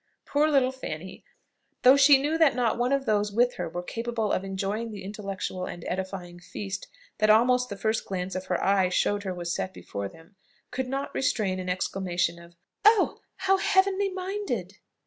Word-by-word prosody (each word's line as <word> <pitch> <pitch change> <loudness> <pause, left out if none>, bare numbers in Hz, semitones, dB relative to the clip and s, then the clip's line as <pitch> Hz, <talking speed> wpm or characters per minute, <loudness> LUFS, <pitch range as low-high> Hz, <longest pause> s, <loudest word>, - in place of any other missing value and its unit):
Poor 295 +2 +2
little 270 -3 +3
Fanny, 190 -9 -7 0.6
though 255 +2 +8
she 280 0 +7
knew 295 +3 0
that 320 -3 +4
not 245 -3 +1
one 245 +2 +1
of 275 -1 +1
those 210 -2 +1
with 245 +4 +3
her 180 - -3
were 175 +2 -5
capable 230 +1 -2
of - - 0
enjoying 195 +4 -3
the 210 -2 -8
intellectual 195 -2 -4
and 175 - -8
edifying 185 -2 -5
feast 195 +3 -6 0.3
that 215 0 +3
almost 250 +3 +4
the 200 - -5
first 220 +2 0
glance 185 -1 -3
of 185 +1 -5
her - - 0
eye 195 -2 +3
showed 205 +3 +1
her 190 -2 -3
was 175 -1 -3
set 185 - -3
before 100 -1 -5
them, 165 - -18 0.3
could 260 0 -2
not 275 +2 -3
restrain 205 -8 0
an 180 0 -4
exclamation 180 -2 -1
of 170 0 -15 0.3
"Oh! 430 -1 +4 0.2
How 385 0 +2
heavenly 390 0 +2
minded!" 385 +2 -4
210 Hz, 185 wpm, -27 LUFS, 185-265 Hz, 0.6 s, though